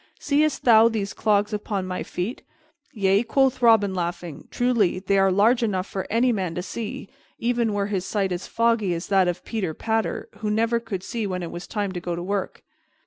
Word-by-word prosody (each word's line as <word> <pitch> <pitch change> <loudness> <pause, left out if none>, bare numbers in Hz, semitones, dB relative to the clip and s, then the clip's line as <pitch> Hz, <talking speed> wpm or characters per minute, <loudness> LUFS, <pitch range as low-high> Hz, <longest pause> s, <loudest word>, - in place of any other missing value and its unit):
Seest 295 0 +1
thou 225 -1 +7
these 210 -3 -3
clogs 210 0 +1
upon 205 -2 -2
my 185 0 -4
feet?" 185 +8 -4 0.5
"Yea," 195 -1 +2
quoth 260 +2 +1
Robin, 220 -5 +5
laughing, 175 -3 -4
"truly, 235 -7 +1
they 195 +1 +1
are 195 0 +4
large 220 +6 +3
enough 190 -5 0
for 190 -1 -5
any 240 +3 +3
man 185 -7 -2
to 180 - -3
see, 210 0 -6 0.3
even 235 -1 0
were 205 -1 0
his 200 -3 -2
sight 195 -1 -1
as 180 0 -4
foggy 230 -6 +1
as 170 - -5
that 190 -2 +4
of 175 0 -3
Peter 190 -9 -3
Patter, 225 0 -1
who 215 - -2
never 230 +2 +1
could 200 -5 -5
see 225 -1 -3
when 180 -2 -3
it 170 - -5
was 175 - -7
time 205 -3 -2
to 180 - -4
go 175 0 -3
to 175 - -5
work." 200 +1 -3
205 Hz, 200 wpm, -24 LUFS, 185-230 Hz, 0.5 s, thou